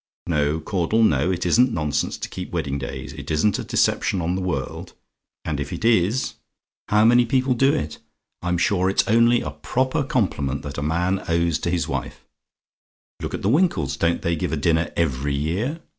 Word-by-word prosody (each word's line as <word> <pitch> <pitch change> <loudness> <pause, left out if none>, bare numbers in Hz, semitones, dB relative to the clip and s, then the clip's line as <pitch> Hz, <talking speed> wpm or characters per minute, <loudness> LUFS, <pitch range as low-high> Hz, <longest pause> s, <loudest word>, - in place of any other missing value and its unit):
No, 75 -1 0
Caudle, 95 +6 +1
no; 75 -4 +3
it 90 -1 -1
isn't 120 +8 +4
nonsense 75 -5 -1
to - - -5
keep - - -7
wedding 70 +1 -2
days; 70 - -6
it - - -9
isn't 80 +6 +1
a - - -3
deception 95 - +1
on 85 +1 -1
the 95 - -2
world; 80 -8 -4 0.5
and 75 -3 -2
if 70 0 -4
it - - -4
is, 115 +2 +2 0.5
how 105 +2 +4
many 120 +1 +6
people 130 +2 +1
do 135 +3 +3
it! 75 - -3 0.4
I'm 90 0 0
sure 95 +1 +2
it's 95 - +1
only 115 +2 +4
a - - -4
proper 130 +4 -1
compliment 70 - -1
that 70 -1 -5
a - - -3
man 90 +5 0
owes 85 -1 +1
to - - -2
his 85 -1 0
wife. - - -5 1.0
Look - - -3
at - - -7
the 100 - +2
Winkles 170 +8 +2
don't 85 0 0
they 85 0 +1
give 75 - -3
a 80 - -1
dinner 80 +2 +1
every 70 -3 0
year? 100 - -2
90 Hz, 190 wpm, -23 LUFS, 75-115 Hz, 1.0 s, many